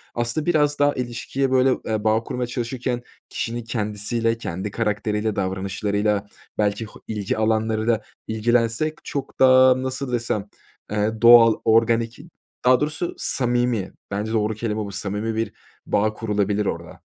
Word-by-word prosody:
Aslında 120 +6 -1
biraz 150 -4 +2
daha 145 0 +4
ilişkiye 130 +2 -2
böyle, 130 0 +4 0.2
eee, 110 -1 -1
bağ 110 +1 +2
kurmaya 125 +1 -3
çalışırken 120 0 -3 0.3
kişinin 120 +1 -3
kendisiyle, 115 +1 -1
kendi 95 -1 -4
karakteriyle, 105 0 -1
davranışlarıyla 100 +2 -1 0.3
belki 105 +1 0
ho 105 - -14
ilgi 105 -2 -2
alanlarıyla 110 0 +1 0.3
ilgilensek 115 +6 +1
çok 140 -2 -5
da 130 0 +6
nasıl 130 0 -3
desem, 115 -4 -1 0.5
eee, 105 +1 -1
doğal, 120 -1 +8
organik, 115 +1 +2 0.5
daha 125 0 +6
doğrusu 155 +3 -2
samimi, 120 -5 0 0.2
bence 105 +2 -2
doğru 110 -1 +1
kelime 110 -1 -2
bu 100 - -7
samimi 105 +2 -3
bir 115 +1 -2 0.3
bağ 110 +1 +1
kurulabilir 105 -1 -1
orada. - - -5
115 Hz, 135 wpm, -23 LUFS, 105-120 Hz, 0.5 s, doğal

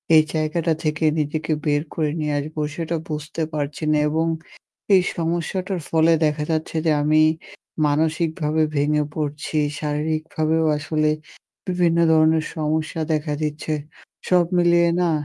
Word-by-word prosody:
এই 155 - +7
জায়গাটা 160 +1 0
থেকে 155 +1 -1 0.2
নিজেকে 155 +2 -2
বের 145 -1 +2
করে 155 -2 0
নিয়ে 150 -1 -1
আসবো 155 +2 -4
সেটা 165 0 -2
বুঝতে 155 +2 -4
পারছি 145 +1 -3
না 155 - +3
এবং 160 +2 0 0.7
এই 185 - +6
সমস্যাটার 175 +3 -2
ফলে 165 0 +4
দেখা 150 0 0
যাচ্ছে 160 0 -2
যে 160 - +4
আমি 155 +1 +4 0.6
মানসিকভাবে 160 +1 0
ভেঙে 150 +1 +2
পড়ছি। 150 0 -3 0.2
শারীরিকভাবেও 155 +1 -1
আসলে 155 0 0 0.6
বিভিন্ন 175 -2 +1
ধরনের 160 0 +4
সমস্যা 155 +1 -1
দেখা 150 0 -1
দিচ্ছে। 150 +1 -2 0.5
সব 180 -1 +4
মিলিয়ে 170 0 +4
না 175 - +2
155 Hz, 130 wpm, -22 LUFS, 150-165 Hz, 0.7 s, এই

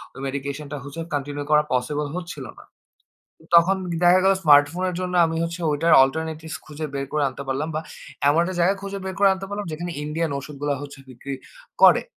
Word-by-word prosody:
ঐ - - -13
মেডিকেশনটা 140 +2 -5
হচ্ছে 140 +4 -8
কন্টিনিউ 145 0 -3
করা 150 0 +5
পসিবল 145 +4 -1
হচ্ছিল 175 -6 -6
না। - - -13 0.9
তখন 170 +3 +6 0.3
দেখা 180 +1 +6
গেলো, 195 0 +5
স্মার্টফোনের 160 +5 +4
জন্য 180 0 -3
আমি 165 0 -2
হচ্ছে 170 +1 -4
ওইটার 160 +3 +3
অল্টারনেটিভস 160 +3 -3
খুঁজে 155 0 -6
বের 140 0 -2
করে 150 -1 +1
আনতে 130 +2 -8
পারলাম, 145 +4 -1
বা 155 - -1 0.5
এমন 145 +3 +4
একটা 185 +1 -3
জায়গা 180 +3 +3
খুঁজে 200 0 -5
বের 190 -1 -4
করে 200 -1 +6
আনতে 190 0 -6
পারলাম, 205 0 -4
যেখানে 175 +3 -5
ইন্ডিয়ান 155 +1 -2
ঔষুধগুলা 145 0 -3
হচ্ছে 145 -1 -9
বিক্রি 130 +2 -7 0.5
করে। - - +7
155 Hz, 180 wpm, -23 LUFS, 145-175 Hz, 0.9 s, করে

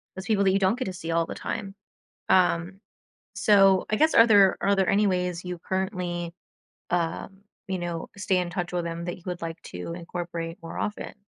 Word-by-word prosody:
those 190 0 -7
people 210 -3 +2
that 190 - +4
you 195 - +2
don't 195 +4 +2
get 255 - -2
to 190 - -4
see 165 -2 -5
all 165 0 +2
the - - -7
time. 200 -3 -5 0.5
Um. 180 +1 +2 0.5
So, 195 -2 +5
I 215 - +2
guess 315 +6 +3
are 230 - +8
there 200 -4 +6
are 200 0 +2
there 190 -1 +2
any 205 +1 +3
ways 180 -2 -1
you 180 -1 -5
currently, 180 -2 -3 0.6
um, 175 +2 -2 0.3
you 190 -1 -2
know, 170 -1 -4
stay 195 -2 +1
in 180 -1 -1
touch 175 +1 -3
with 175 - 0
them 170 0 -4
that 175 - -4
you 180 - -18
would 180 -1 -4
like 165 0 -5
to 90 - -6
incorporate 170 -1 -5
more 165 - -8
often? 210 - -4
180 Hz, 210 wpm, -26 LUFS, 170-195 Hz, 0.6 s, are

